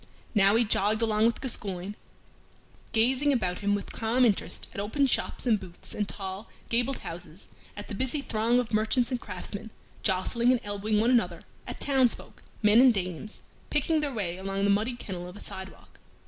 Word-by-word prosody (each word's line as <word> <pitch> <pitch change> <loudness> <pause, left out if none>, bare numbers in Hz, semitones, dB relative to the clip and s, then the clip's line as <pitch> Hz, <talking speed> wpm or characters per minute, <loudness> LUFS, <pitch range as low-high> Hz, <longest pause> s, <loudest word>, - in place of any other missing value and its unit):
Now 200 -1 +5
he 235 - +5
jogged 215 +1 +1
along 220 0 +3
with 235 - -1
Gascoyne, 200 -6 -2 1.0
gazing 260 +6 +3
about 185 -9 0
him 205 0 +1
with 205 - -5
calm 235 +3 +2
interest 210 -5 0
at - - -6
open 220 +8 +1
shops 265 - 0
and 225 -4 +3
booths 180 -3 -11
and 210 -1 -2
tall, 195 +2 -6 0.2
gabled 245 +3 +1
houses; 165 +1 -7 0.3
at 205 - -6
the - - -7
busy 260 +7 -1
throng 230 -2 +1
of 245 -2 -1
merchants 220 +4 +2
and 245 -2 -2
craftsmen, 205 +2 -5 0.3
jostling 230 +5 +2
and 255 - +2
elbowing 205 +1 -1
one 230 +3 +3
another; 180 -9 +1 0.2
at - - -6
townsfolk 265 -4 +2 0.2
men 210 +3 +7
and 255 -3 +6
dames 185 +2 -4 0.3
picking 310 +2 +1
their 295 -2 -1
way 190 -8 -3
along 195 +1 -2
the 200 - +4
muddy 220 +5 +1
kennel 180 -6 -6
of 180 - -11
a - - -10
sidewalk. 190 0 -9
215 Hz, 180 wpm, -28 LUFS, 195-245 Hz, 1.0 s, men